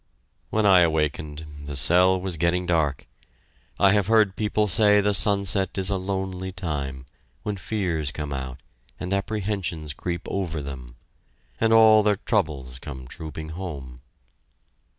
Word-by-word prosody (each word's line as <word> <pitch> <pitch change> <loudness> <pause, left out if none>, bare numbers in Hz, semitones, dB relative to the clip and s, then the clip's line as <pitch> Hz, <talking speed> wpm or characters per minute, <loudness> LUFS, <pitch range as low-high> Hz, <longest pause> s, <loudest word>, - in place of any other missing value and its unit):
When 110 -1 +1
I 95 -2 +7
awakened, 75 -2 0 0.2
the 70 0 -6
cell 90 +7 +5
was 90 -1 -2
getting 85 +3 0
dark. 80 -6 0 0.7
I 100 - +5
have 100 -2 +2
heard 110 -4 +3
people 105 0 0
say 105 +2 +5
the 105 0 +2
sunset 100 -1 +2
is 95 +1 +1
a - - +1
lonely 95 -1 -4
time, 70 -8 -4 0.4
when 105 - -3
fears 90 -7 -2
come 75 -1 -5
out, 65 -1 -6 0.4
and 90 +1 -3
apprehensions 100 -7 -3
creep 85 +3 -4
over 85 -5 -3
them... 65 -4 -8 0.6
and 115 0 +2
all 110 -1 +7
their 105 -1 +2
troubles 65 -9 -2
come 65 -3 -9
trooping 80 +1 -7
home. 70 -8 -7
90 Hz, 140 wpm, -24 LUFS, 75-100 Hz, 0.7 s, I